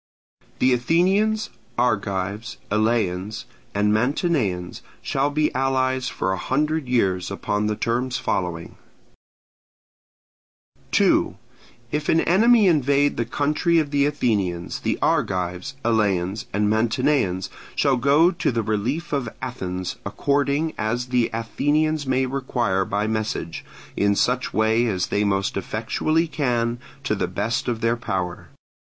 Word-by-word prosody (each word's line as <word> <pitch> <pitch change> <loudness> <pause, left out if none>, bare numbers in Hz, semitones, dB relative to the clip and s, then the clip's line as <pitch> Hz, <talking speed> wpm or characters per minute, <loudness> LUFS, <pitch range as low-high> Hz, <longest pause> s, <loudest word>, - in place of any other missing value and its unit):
The 130 0 +3
Athenians, 190 - +2 0.3
Argives, 105 -1 -1
Eleans, 105 -1 0 0.3
and 105 +1 +2
Mantineans 110 - 0 0.2
shall 135 +1 0
be 150 +1 0
allies 130 -1 0
for 95 - -2
a 95 - -3
hundred 150 - 0
years 95 -7 +1
upon 105 +1 -1
the 105 - 0
terms 120 +3 -1
following: 90 -8 -3 2.1
2. - - +3 0.5
If 150 0 -2
an 165 - +4
enemy 220 +5 +5
invade 145 -3 +3
the 115 - -1
country 150 +6 +1
of 150 -3 +1
the 140 -1 +3
Athenians, 100 -12 -1
the - - -1
Argives, 90 +6 0
Eleans, 105 -3 +1
and 105 +1 +1
Mantineans 110 -3 +1 0.2
shall 135 -2 +2
go 145 +7 +4
to 170 - -1
the 115 -2 -1
relief 125 +11 -2
of 135 -5 -1
Athens, 95 -8 -4
according 140 +8 0
as 120 +3 -1
the 125 -2 +2
Athenians 145 +6 0
may 130 0 +2
require 120 -7 -1
by 105 +2 -1
message, 110 -6 -3 0.3
in 100 0 +2
such 125 +2 +1
way 110 +2 +2
as 95 -5 -1
they 105 - +1
most 100 -1 0
effectually 130 - 0
can, 120 -6 -1 0.2
to 140 - 0
the 100 - -1
best 115 +7 -2
of 115 -2 -2
their 115 +1 +2
power. 95 -6 -4
120 Hz, 125 wpm, -23 LUFS, 100-140 Hz, 2.1 s, enemy